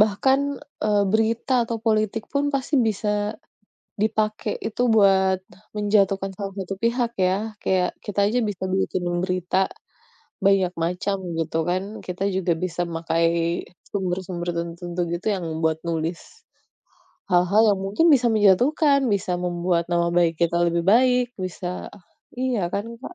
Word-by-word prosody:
bahkan, 220 Hz, +6 st, +3 dB, 0.4 s
eee, 210 Hz, -1 st, +3 dB
berita 225 Hz, +4 st, +1 dB
atau 230 Hz, -, -2 dB
politik 215 Hz, -1 st, +1 dB
pun 280 Hz, 0 st, +1 dB
pasti 275 Hz, +2 st, -1 dB
bisa, 210 Hz, 0 st, -2 dB, 0.9 s
dipakai 215 Hz, 0 st, 0 dB
itu 220 Hz, +2 st, -5 dB
buat 190 Hz, -3 st, +4 dB, 0.4 s
menjatuhkan 200 Hz, -2 st, +2 dB
salah 195 Hz, -1 st, -5 dB
satu 195 Hz, 0 st, -4 dB
pihak 235 Hz, 0 st, +1 dB
ya. 185 Hz, 0 st, +3 dB, 0.3 s
Kayak, 185 Hz, -1 st, +2 dB, 0.2 s
kita 205 Hz, -1 st, -6 dB
aja 245 Hz, -, +1 dB
bisa 190 Hz, -2 st, -4 dB
bikin 190 Hz, -1 st, -1 dB, 0.2 s
berita, 185 Hz, -1 st, -1 dB, 0.9 s
banyak 195 Hz, -2 st, +3 dB
macam, 180 Hz, +4 st, -1 dB, 0.2 s
gitu 160 Hz, 0 st, -2 dB
kan. 185 Hz, +1 st, 0 dB, 0.2 s
Kita 180 Hz, +1 st, -5 dB
juga 185 Hz, -2 st, +1 dB
bisa 175 Hz, -1 st, -4 dB
memakai, 165 Hz, 0 st, 0 dB, 0.6 s
sumber-sumber 180 Hz, -2 st, -3 dB
tertentu 170 Hz, +1 st, -4 dB
gitu 175 Hz, +4 st, -4 dB
yang 185 Hz, -3 st, -4 dB, 0.2 s
buat 160 Hz, 0 st, +1 dB
nulis, 165 Hz, +1 st, -2 dB, 1.1 s
hal-hal 180 Hz, +5 st, +4 dB
yang 195 Hz, -, -2 dB
mungkin 205 Hz, +12 st, +2 dB
bisa 245 Hz, -3 st, +2 dB
menjatuhkan, 245 Hz, -, +4 dB
bisa 200 Hz, -3 st, 0 dB
membuat 175 Hz, -1 st, -1 dB
nama 170 Hz, 0 st, +1 dB
baik 170 Hz, -1 st, +3 dB
kita 170 Hz, 0 st, -1 dB
lebih 170 Hz, 0 st, -1 dB
baik, 250 Hz, +1 st, +4 dB, 0.2 s
bisa 180 Hz, 0 st, -5 dB, 0.5 s
iya 255 Hz, -4 st, 0 dB
kan 200 Hz, -, -1 dB, 0.2 s
Kak. 315 Hz, -, -9 dB
190 Hz, 135 wpm, -23 LUFS, 175-215 Hz, 1.1 s, buat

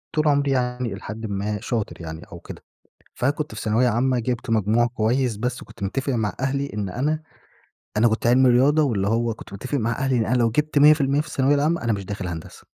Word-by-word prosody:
طول 155 Hz, 0 st, +2 dB
عمري 140 Hz, -1 st, +2 dB
يعني 125 Hz, -3 st, -1 dB
الى 100 Hz, -, -8 dB
حدٍّ 110 Hz, +2 st, -6 dB
ما 105 Hz, 0 st, -2 dB
شاطر 110 Hz, -6 st, -3 dB
يعني 80 Hz, 0 st, -7 dB
أو -, -, -9 dB
كده، -, -, -11 dB, 0.5 s
فكنت 145 Hz, -1 st, -1 dB
في 105 Hz, -, -6 dB
ثانوية 115 Hz, +3 st, +2 dB
عامةً 125 Hz, +2 st, +1 dB
جيبت 120 Hz, 0 st, -3 dB
مجموع 110 Hz, +2 st, +2 dB
كويّس، 120 Hz, +1 st, 0 dB
بس 125 Hz, +4 st, -3 dB
وكنت -, -, -13 dB
متّفق 135 Hz, +7 st, -1 dB
مع 110 Hz, -5 st, -1 dB
أهلي 140 Hz, +1 st, -1 dB
إن 100 Hz, -2 st, -2 dB
أنا 150 Hz, +10 st, -1 dB, 0.7 s
أنا 115 Hz, +2 st, +5 dB
كنت 110 Hz, +1 st, -1 dB
علم 130 Hz, +2 st, +5 dB
الرياضة، 135 Hz, +5 st, +4 dB
واللي 105 Hz, -8 st, 0 dB
هو 115 Hz, +1 st, 0 dB
كنت 100 Hz, -, -13 dB
متّفق 130 Hz, +8 st, -3 dB
مع 115 Hz, +1 st, 0 dB
أهلي 135 Hz, +1 st, 0 dB
إن 115 Hz, -2 st, +1 dB
أنا 125 Hz, -, +1 dB
لو 120 Hz, -2 st, +2 dB
جبت 150 Hz, +5 st, +1 dB
100% 145 Hz, -1 st, +5 dB
في -, -, -4 dB
الثانوية 135 Hz, +2 st, +2 dB
العامةً، 155 Hz, +4 st, +1 dB
أنا 115 Hz, -, +1 dB
مش 100 Hz, -2 st, -3 dB
داخل 100 Hz, -2 st, -5 dB
هندسة. 80 Hz, -2 st, -8 dB
120 Hz, 215 wpm, -23 LUFS, 110-135 Hz, 0.7 s, أنا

